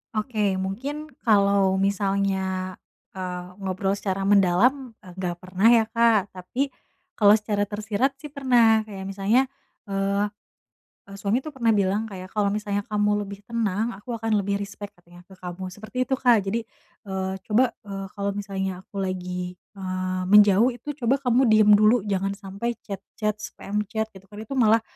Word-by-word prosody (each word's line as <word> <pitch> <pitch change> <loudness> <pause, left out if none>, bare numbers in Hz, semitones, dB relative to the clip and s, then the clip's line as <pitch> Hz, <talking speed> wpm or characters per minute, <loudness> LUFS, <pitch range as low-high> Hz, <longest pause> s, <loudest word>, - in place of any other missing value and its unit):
Oke 210 -3 0
mungkin 270 +11 -4
kalo 200 -3 +3
misalnya, 195 -1 0 0.4
eee, 180 -1 -5 0.2
ngobrol 190 0 -1
secara 195 -1 -2
mendalam 205 +6 +3
e - - -15
gak 175 -2 -2
pernah 185 +4 +2
ya 235 -1 +6
Kak 230 -4 +3
tapi, 245 +10 -3 0.5
kalo 205 -1 +7
secara 210 -1 -1
tersirat 210 +6 -1
sih 300 - -7
pernah. 235 -6 +4
Kayak 195 -3 -8
misalnya, 200 +6 +2 0.5
eee, 200 +1 0 0.8
e - - -16
suami 205 +4 +1
tuh 310 - -6
pernah 235 -3 +2
bilang 200 +2 +1
kayak, 185 -1 -8
"Kalau 205 -2 +2
misalnya 205 -1 -1
kamu 210 -1 +1
lebih 200 0 -9
tenang, 225 -1 -1
aku 205 +5 -8
akan 225 0 0
lebih 200 +1 -1
respect 200 0 -7
katanya 175 0 -17
ke 190 - -15
kamu," 180 +1 -6
seperti 215 +5 -4
itu 265 - 0
Kak. 235 -5 +4
Jadi, 225 +4 -1 0.4
eee, 190 0 -2
"Coba," 235 +4 +3 0.2
eee, 195 -1 -5
"kalau 200 0 -2
misalnya 195 -2 -3
aku 200 - -9
lagi," 180 -1 -3
eee, 185 -1 -4
"menjauh 205 +2 +7
itu 295 +5 -6
coba 240 +2 +2
kamu 250 +1 +3
diam 215 -1 +6
dulu 215 +2 +4
jangan 195 -1 -1
sampai 200 +4 -4
chat-chat, 210 +2 -4
spam 210 -1 -4
chat," 220 0 -2
gitu 190 0 -15
kan, 205 - -13
"itu 220 - -9
malah, 225 -1 +5
200 Hz, 160 wpm, -25 LUFS, 190-220 Hz, 0.8 s, kalo